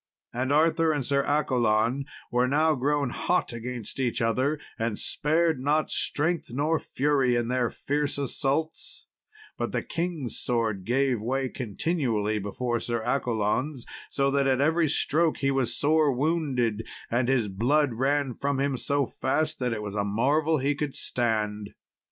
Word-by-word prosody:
And 130 +3 -1
Arthur 160 +2 +3
and 145 -4 -1
Sir 140 +1 +2
Accolon 125 -3 +1 0.3
were 125 +1 +2
now 155 +4 +3
grown 140 -1 0
hot 180 -3 0
against 120 0 -6
each 125 -3 0
other, 130 +6 +1 0.2
and 115 -2 -1
spared 160 0 +1
not 150 +4 +1
strength 160 -1 -1
nor 150 +5 +1
fury 135 -3 +1
in 120 0 0
their 125 -2 +1
fierce 145 0 -2
assaults; 140 +3 -2 0.5
but - - -2
the - - -1
king's 165 - -3
sword 110 -6 -1
gave 125 -1 +1
way 130 +3 -1
continually 115 - -1
before 120 +4 -2
Sir 120 -1 -2
Accolon's, 125 +2 -1 0.2
so 140 0 +1
that 140 0 +2
at 130 -1 +2
every 160 +2 +3
stroke 160 +2 +1
he 135 0 +1
was 135 -3 0
sore 155 0 +3
wounded, 130 -6 0 0.2
and 120 +2 +1
his 125 -5 +2
blood 125 +8 +1
ran 140 -1 +1
from 140 +2 -1
him 140 -1 0
so 140 +3 0
fast 140 +6 -1
that 125 -1 0
it 110 -2 -3
was 100 -1 -5
a 100 -1 0
marvel 145 +10 +2
he 140 +1 +1
could 145 -1 -3
stand. 105 -3 -2
135 Hz, 155 wpm, -27 LUFS, 120-145 Hz, 0.5 s, Arthur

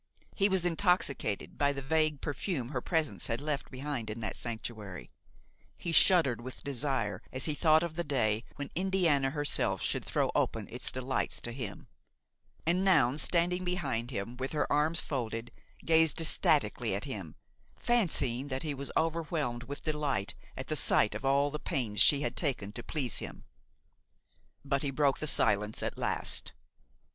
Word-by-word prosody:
He 200 0 +3
was 190 -2 +2
intoxicated 165 - 0
by 145 0 +3
the 140 - -5
vague 155 0 +1
perfume 145 - -3
her 130 -3 -3
presence 160 0 -1
had 115 -2 -1
left 150 0 -3
behind 130 -4 -4
in 110 +2 -5
that 110 - -3
sanctuary; 110 - -6 0.7
he 170 - -3
shuddered 160 - +5
with 130 +1 -7
desire 130 -8 -1
as 130 +1 0
he 155 - 0
thought 155 +1 +4
of 170 -2 -4
the 170 - -1
day 115 -7 +1
when 140 -1 -6
Indiana 175 -7 +2
herself 145 +1 +1
should - - -1
throw - - 0
open - - 0
its - - -1
delights 130 +1 -2
to 120 - -4
him; 120 -5 -6 0.8
and 175 +3 +2
Noun, 150 -8 +4
standing 180 +2 +2
behind 140 -11 -2
him 115 -1 -4
with 130 +3 -4
her 150 - +1
arms 155 +3 +2
folded, 115 -4 -4 0.3
gazed 160 -1 +4
ecstatically 165 - +2
at - - -3
him, - - -6 0.4
fancying 145 - +1
that 130 -1 -3
he 150 -2 -2
was 140 0 -6
overwhelmed 160 -7 -1
with 140 +2 -7
delight 150 -10 -1 0.2
at - - -5
the - - -2
sight - - +4
of - - -6
all 140 +1 +3
the 150 - -4
pains 120 - -1
she 145 -1 +6
had - - -2
taken 130 - -1
to 120 - -7
please 130 -1 -2
him. - - -8 1.2
But 140 -1 0
he 145 - -1
broke 140 0 +1
the 155 - -3
silence 105 -5 +3
at - - -2
last. - - -1
140 Hz, 165 wpm, -31 LUFS, 120-160 Hz, 1.2 s, she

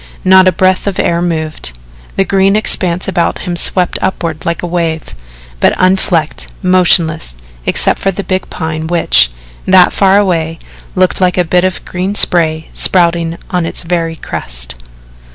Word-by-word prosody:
Not 190 0 +6
a - - +5
breath 185 +2 +1
of 195 - -2
air 170 0 0
moved. 155 - -3 0.4
The 195 - +1
green 195 +1 +2
expanse 180 -4 +1
about 175 -3 0
him 175 - -3
swept 180 +1 0
upward 165 -5 -3
like 170 +1 -2
a - - -1
wave 165 -2 -3 0.5
but - - +2
unflecked, 180 -4 0 0.2
motionless, 175 - +2 0.3
except - - +1
for 195 - 0
the 195 +1 -4
big 185 0 -3
Pine 160 -1 -4
which, 65 - +3 0.4
that 185 -1 +5
far 195 0 +3
away, 165 -5 0 0.4
looked 185 0 +1
like 180 0 +1
a 180 - +3
bit 180 +2 +1
of 185 -1 -2
green 185 +3 -3
spray, 160 -5 +3
spouting 170 -2 +1
on 180 -1 0
its - - -7
very 165 -1 -2
crest. - - -4
175 Hz, 155 wpm, -12 LUFS, 165-185 Hz, 0.5 s, Not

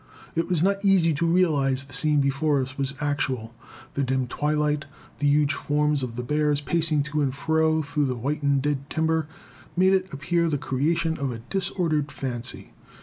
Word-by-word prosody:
It 165 +1 0
was 175 -3 +2
not 200 +1 +1
easy 185 -5 +4
to 165 +4 0
realize 145 -7 +2
the 135 -1 -13
scene 150 +1 +2
before 140 +1 +1
us 135 +2 -4
was 140 0 -2
actual. 130 -6 -2 0.4
The 140 - -1
dim 130 0 0
twilight, 150 +3 0 0.3
the 145 - +1
huge 145 0 +3
forms 150 +1 0
of 125 -3 -4
the 125 - -3
bears 150 +2 +1
pacing 155 -1 +1
to 150 +1 -2
and 135 -2 +1
fro 160 +2 +1
through 145 0 0
the 130 - -1
whitened 140 +2 0
dead 145 -1 -1
timber, 160 -1 0 0.5
made 190 +1 +5
it 190 0 +1
appear 170 +4 0
the 145 - 0
creation 160 +5 0
of 140 -2 -1
a 120 - -5
disordered 175 -6 0
fancy. 125 -3 -5
150 Hz, 180 wpm, -25 LUFS, 140-160 Hz, 0.5 s, made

